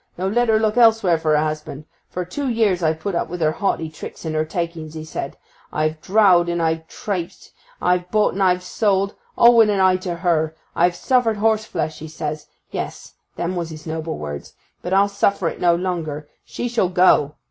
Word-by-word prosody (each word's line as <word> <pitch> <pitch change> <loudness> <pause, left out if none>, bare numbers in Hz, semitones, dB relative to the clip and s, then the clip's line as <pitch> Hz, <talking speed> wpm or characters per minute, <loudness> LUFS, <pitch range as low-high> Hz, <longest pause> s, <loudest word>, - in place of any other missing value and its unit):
No; 185 +2 -1
let 240 +4 +1
her 220 - +5
look 220 +1 0
elsewhere 225 -8 +4
for 155 -1 +2
a 150 - +3
husband. 155 -1 -5 0.2
For 180 0 -4
tew 275 +11 -4
years 215 -6 +1
I've 160 -1 +1
put 200 +4 -3
up 170 - -1
with 180 +1 -5
her 155 -2 +2
haughty 165 -2 -1
tricks 155 +1 -9
and 160 - -2
her 155 0 +1
takings," 160 -1 -4
'a 155 - -6
said. 150 -3 -6 0.3
"I've 155 0 -1
droudged 185 -3 +4
and 170 0 -1
I've 160 0 -1
traipsed, 180 -4 -5 0.3
I've 180 0 +1
bought 215 +1 +2
and 195 - -3
I've 180 -1 +3
sold, 200 +1 0 0.2
all 235 0 +7
wi' 225 -1 +7
an 205 -2 +1
eye 185 -1 +4
to 185 -2 -4
her; 165 -3 0 0.2
I've 175 +1 +3
suffered 240 +1 +1
horseflesh," 210 -8 0
he 160 - -7
says—yes, 155 -1 -7 0.2
them 175 +2 -2
was 170 -2 -3
his 155 -1 -10
noble 160 0 -4
words—"but 75 - -8
I'll 195 +1 +4
suffer 200 -2 +1
it - - -9
no 175 -1 +4
longer. 165 -5 -3 0.2
She 245 - -4
shall 230 -6 +1
go!" 180 -5 +4
175 Hz, 195 wpm, -21 LUFS, 160-200 Hz, 0.3 s, all